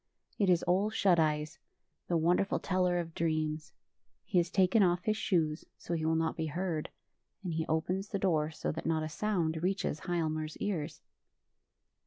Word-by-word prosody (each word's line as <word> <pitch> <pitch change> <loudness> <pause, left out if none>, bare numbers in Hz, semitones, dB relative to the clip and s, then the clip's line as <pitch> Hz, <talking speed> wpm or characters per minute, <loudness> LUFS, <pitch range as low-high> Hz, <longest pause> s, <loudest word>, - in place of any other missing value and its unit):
It 200 -3 +3
is 175 -2 +4
Ole 185 +4 +2
Shut 190 -5 +3
Eyes, 155 +1 0 0.5
the 170 - +2
wonderful 175 +4 +2
teller 180 -1 +1
of 165 -2 -3
dreams. 155 -2 -1 0.5
He 180 - +2
has 170 0 0
taken 190 +3 +4
off 175 -2 +3
his 215 - +1
shoes, 165 -7 0
so - - -5
he 165 - -1
>vill 160 +1 +1
not 160 0 0
be 160 -1 -2
heard, 165 0 -2 0.5
and 175 -3 -3
he 160 0 -1
opens 180 +5 -1
the 200 - -1
door 160 -6 +1
so 160 - -3
that 160 - -5
not 160 -1 +1
a 155 - -3
sound 165 -3 -1
reaches 185 -4 -1
Hialmar's 155 -3 -2
ears. 170 -7 -3
170 Hz, 175 wpm, -32 LUFS, 155-185 Hz, 0.5 s, is